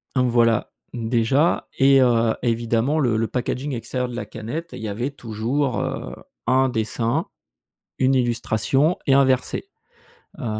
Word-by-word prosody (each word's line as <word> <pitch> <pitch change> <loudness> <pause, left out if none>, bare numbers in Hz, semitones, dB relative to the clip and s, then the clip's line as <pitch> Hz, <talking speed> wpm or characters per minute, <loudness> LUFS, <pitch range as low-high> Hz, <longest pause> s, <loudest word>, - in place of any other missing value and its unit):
Voilà, 120 -3 +2 0.2
déjà, 120 +6 +1
et 135 0 +6
heu, 115 -2 +3
évidemment 120 +5 +1
le 120 -6 +2
le 110 0 0
packaging 130 +4 -3
extérieur 125 +2 -3
de 120 - -7
la 120 - -4
canette, 145 +10 -6
il - - -7
y 110 - -4
avait 120 +7 -3
toujours, 125 +2 -2
heu, - - -4 0.3
un 130 +1 +3
dessin, 115 0 -1 0.7
une 130 +1 +3
illustration 125 +5 +1
et 135 - +4
un 140 0 +6
verset. 130 - 0 0.8
Heu, - - -5
125 Hz, 140 wpm, -22 LUFS, 115-135 Hz, 0.8 s, et